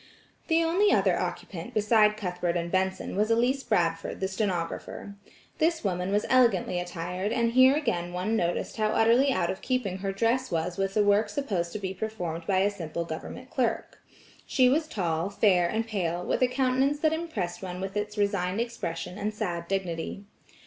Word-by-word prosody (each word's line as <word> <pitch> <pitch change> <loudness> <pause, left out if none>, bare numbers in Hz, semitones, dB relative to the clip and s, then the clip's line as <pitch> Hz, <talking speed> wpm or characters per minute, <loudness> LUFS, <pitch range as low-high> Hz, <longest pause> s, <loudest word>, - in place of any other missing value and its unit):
The 330 0 +3
only 365 +6 +3
other - - +3
occupant 170 -3 -5
beside 210 0 +4
Cuthbert 180 -3 -2
and 170 0 -3
Benson 190 0 -1
was 210 +2 +1
Elise 245 +4 +2
Bradford 165 -7 0
the 190 - 0
stenographer. 190 0 -3 0.5
This 325 0 +1
woman 180 -1 -1
was 205 +1 +1
elegantly 235 -8 +3
attired, 180 +3 -3
and 235 -1 +1
here 260 +3 +6
again 175 - -1
one 185 +5 -1
noticed 175 +1 -1
how 215 -1 +2
utterly 230 +5 +4
out 170 -9 +1
of 190 - -7
keeping 235 -8 -1
her 195 0 -2
dress 230 +6 0
was 170 +1 -1
with 195 0 -1
the 210 - +4
work 205 +1 +3
supposed 200 -9 -2
to - - -2
be 190 -2 -4
performed 180 -6 -4
by 190 -1 +3
a 200 +1 +2
simple 170 -3 -4
government 210 +10 -7
clerk. 250 -3 -1 0.5
She 255 -1 +4
was 310 +4 +1
tall, 170 - -1
fair 190 -4 +3
and 225 +3 -1
pale, 180 -5 -2
with - - -1
a 255 - +5
countenance 265 +3 +1
that 315 -1 +3
impressed 275 - -3
one 180 -1 -5
with 195 +1 -5
its 210 0 -3
resigned 200 -1 0
expression 185 -6 -4
and 210 +1 -1
sad 170 -5 -4
dignity. 190 0 -3
200 Hz, 180 wpm, -27 LUFS, 180-235 Hz, 0.5 s, here